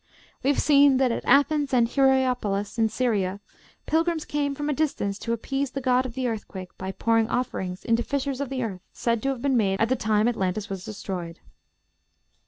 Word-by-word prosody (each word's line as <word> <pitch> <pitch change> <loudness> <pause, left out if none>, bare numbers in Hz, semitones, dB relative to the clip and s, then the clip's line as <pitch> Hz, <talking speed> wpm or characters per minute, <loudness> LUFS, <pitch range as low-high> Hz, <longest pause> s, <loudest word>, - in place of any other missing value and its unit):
We 270 - +1
have 285 - +2
seen 280 -2 +5
that 260 -2 +2
at - - -3
Athens 285 +1 +3
and 235 -2 +4
at - - -15
Hierapolis, 250 -6 +1
in 220 -1 +3
Syria, 205 -5 0 0.5
pilgrims 325 0 0
came 285 -1 -1
from 295 +1 -3
a 300 - +1
distance 265 -10 -1
to 230 - -4
appease 270 +4 -2
the 275 - -4
god 255 0 +2
of 240 - -11
the 260 -1 -1
earthquake, 195 -5 -6
by 190 0 -5
pouring 225 +1 +1
offerings 190 -7 -3
into 230 0 +2
fissures 280 0 -2
of 280 - -3
the 260 -2 -2
earth 195 -5 -5
said 230 -2 -1
to 270 - 0
have 260 -3 -3
been 275 -2 +2
made 195 -4 +1
at 225 - +2
the 260 - +3
time 215 -2 +1
Atlantis 200 -3 -1
was 190 -2 -5
destroyed. 180 -5 -6
245 Hz, 200 wpm, -25 LUFS, 210-275 Hz, 0.5 s, seen